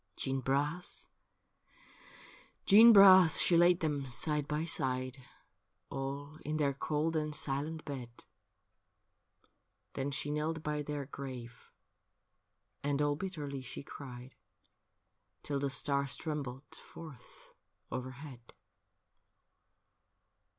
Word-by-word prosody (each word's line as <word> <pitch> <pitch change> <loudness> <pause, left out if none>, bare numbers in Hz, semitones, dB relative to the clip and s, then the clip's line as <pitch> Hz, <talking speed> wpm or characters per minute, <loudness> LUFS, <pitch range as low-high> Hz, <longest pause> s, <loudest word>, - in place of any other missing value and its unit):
Jeanne 135 0 -2
Bras, 145 +7 -2 1.6
Jeanne 220 +4 +9
Bras, 190 -5 +8
she 175 - +4
laid 175 +1 +5
them 145 -4 -1
side 150 +3 0
by 150 +2 -1
side, 130 -4 -2 0.7
All 140 +2 -5
in 155 +1 -2
their 140 -2 +1
cold 155 +3 -1
and 150 -1 -1
silent 150 +2 -3
bed; 125 -4 -7 1.7
Then 135 +1 -2
she 145 +1 -2
knelt 155 +1 -2
by 150 0 -2
their 145 -1 -4
grave, 130 -4 -9 1.1
and 145 0 0
all 145 0 +2
bitterly 150 -6 -5
she 130 - -7
cried 130 -2 -10 1.1
Till 140 -1 -2
the 140 0 -1
stars 140 +1 0
trembled 145 -4 -5
forth 155 -7 -13 0.4
overhead. 130 -1 -8
145 Hz, 100 wpm, -33 LUFS, 135-155 Hz, 1.7 s, Jeanne